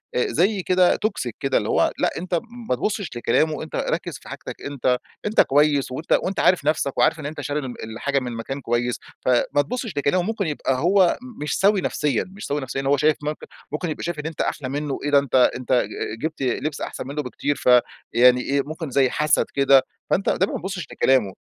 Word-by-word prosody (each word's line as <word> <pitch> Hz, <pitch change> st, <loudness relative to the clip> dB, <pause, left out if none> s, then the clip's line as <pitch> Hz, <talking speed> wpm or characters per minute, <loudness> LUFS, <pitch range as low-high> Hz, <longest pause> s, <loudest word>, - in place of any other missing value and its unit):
آآ 125 Hz, -, +2 dB
زي 190 Hz, +4 st, +1 dB
كده 185 Hz, 0 st, +4 dB
Toxic 200 Hz, -, -2 dB
كده 135 Hz, -1 st, +1 dB
اللي -, -, -1 dB
هو -, -, +3 dB
لأ، -, -, +3 dB
أنت 175 Hz, 0 st, -1 dB, 0.3 s
ما -, -, +3 dB
تبُصّش 205 Hz, -, -2 dB
لكلامُه، 155 Hz, +6 st, +2 dB
وأنت -, -, -6 dB
ركز -, -, -2 dB
في -, -, -14 dB
حاجتك -, -, -7 dB
أنت 130 Hz, -3 st, 0 dB, 0.3 s
أنت 210 Hz, +1 st, +4 dB
كويس، 145 Hz, -1 st, +2 dB
وأنت 150 Hz, +6 st, -6 dB
وأنت 195 Hz, -, -2 dB
عارف 180 Hz, -6 st, +3 dB
نفسك، 145 Hz, -2 st, 0 dB
وعارف 165 Hz, -, +3 dB
إن 150 Hz, -, -7 dB
أنت 150 Hz, +2 st, -5 dB
شاري 145 Hz, +1 st, -2 dB
من 135 Hz, -, -5 dB
ال 110 Hz, -2 st, -8 dB
الحاجة 140 Hz, +5 st, 0 dB
من 125 Hz, -2 st, -5 dB
مكان 135 Hz, +5 st, -5 dB
كويس، 120 Hz, 0 st, -1 dB, 0.3 s
ف -, -, +2 dB, 0.2 s
ما 145 Hz, -, +4 dB
تبُصّش 220 Hz, -, -5 dB
لكلامُه، 145 Hz, +6 st, +2 dB
ممكن 215 Hz, -3 st, -2 dB
يبقى 145 Hz, -3 st, -1 dB
هو 180 Hz, +3 st, +4 dB
م 250 Hz, -10 st, -9 dB
مش 150 Hz, -, -1 dB
سَوِي 200 Hz, 0 st, +4 dB
نفسيًا، 145 Hz, -9 st, 0 dB
مش 195 Hz, +3 st, -9 dB
سَوِي 145 Hz, +1 st, -1 dB
نفسيًا، 130 Hz, +1 st, -3 dB
إن -, -, -7 dB
هو 140 Hz, +1 st, +3 dB
شايف 150 Hz, +2 st, +3 dB
ممكن 150 Hz, +1 st, -4 dB, 0.2 s
ممكن 160 Hz, +4 st, -2 dB
يبقى 155 Hz, -, -5 dB
شايف 170 Hz, -2 st, -3 dB
إن 150 Hz, -, -6 dB
أنت 160 Hz, -1 st, -3 dB
أحلى 130 Hz, -3 st, -2 dB
مِنُّه 145 Hz, 0 st, -2 dB
إيه، 145 Hz, -, -1 dB
ده 140 Hz, -, +7 dB
أنت 140 Hz, -3 st, -3 dB, 0.2 s
أنت 130 Hz, +1 st, -2 dB
ج 120 Hz, -2 st, -1 dB
جبت 160 Hz, -2 st, -3 dB
لبس 140 Hz, +3 st, -2 dB
أحسن -, -, -5 dB
مِنُّه 145 Hz, +2 st, -3 dB
بكتير، 145 Hz, +3 st, -2 dB
ف -, -, 0 dB, 0.4 s
يعني 125 Hz, +1 st, +6 dB
إيه 140 Hz, +2 st, 0 dB
ممكن 155 Hz, +1 st, -6 dB
زي 130 Hz, 0 st, +3 dB
حسد 150 Hz, +3 st, +2 dB
كده، 140 Hz, -1 st, +5 dB, 0.3 s
فأنت 195 Hz, -, +1 dB
ده 190 Hz, -, +2 dB
ما -, -, -3 dB
تبُصّش 190 Hz, +1 st, -5 dB
لكلامُه، 130 Hz, -8 st, +2 dB
145 Hz, 225 wpm, -23 LUFS, 135-175 Hz, 0.4 s, ده